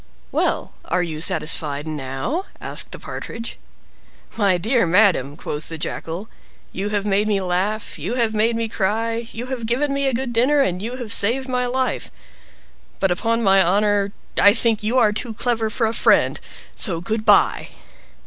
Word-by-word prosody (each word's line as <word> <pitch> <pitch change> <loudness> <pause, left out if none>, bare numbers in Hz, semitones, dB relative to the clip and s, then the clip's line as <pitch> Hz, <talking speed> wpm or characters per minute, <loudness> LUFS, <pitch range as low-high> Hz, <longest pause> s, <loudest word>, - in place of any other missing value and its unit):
"Well, - - 0
are 180 - 0
you 155 -3 -5
satisfied 150 -3 0
now?" 155 - -3
asked - - -4
the - - -6
Partridge. 230 0 -7 0.8
"My 200 -5 +3
dear 225 +2 +1
madam!" 165 -7 +3
quoth 150 +1 -6
the 165 - -6
Jackal, 165 +5 -5 0.4
"you 200 +2 -3
have 205 -1 -1
made 205 +1 +2
me 205 -2 +2
laugh, 190 +2 -2
you 190 +11 -3
have 230 -3 +1
made 220 +2 +2
me 230 0 -1
cry, 225 +3 -1
you 235 +2 -6
have 235 -3 -4
given 275 +5 0
me 275 0 0
a 265 - +1
good 250 0 -3
dinner, 260 +6 +3
and 180 -7 0
you 235 +4 -4
have 240 -5 -4
saved 255 +6 +1
my 250 -1 0
life; 255 -3 -1 0.9
but, 195 -2 +2
upon 230 +6 0
my 195 -1 +5
honor, 200 +2 +2 0.3
I 205 +2 +7
think 230 -2 +1
you 220 +4 0
are 215 -4 +5
too 225 +1 -3
clever 230 -1 0
for 225 +2 0
a 220 - 0
friend - - +3 0.4
so 175 -7 +1
good 215 +5 -2
by!" 210 -2 +4
215 Hz, 175 wpm, -21 LUFS, 185-235 Hz, 0.9 s, I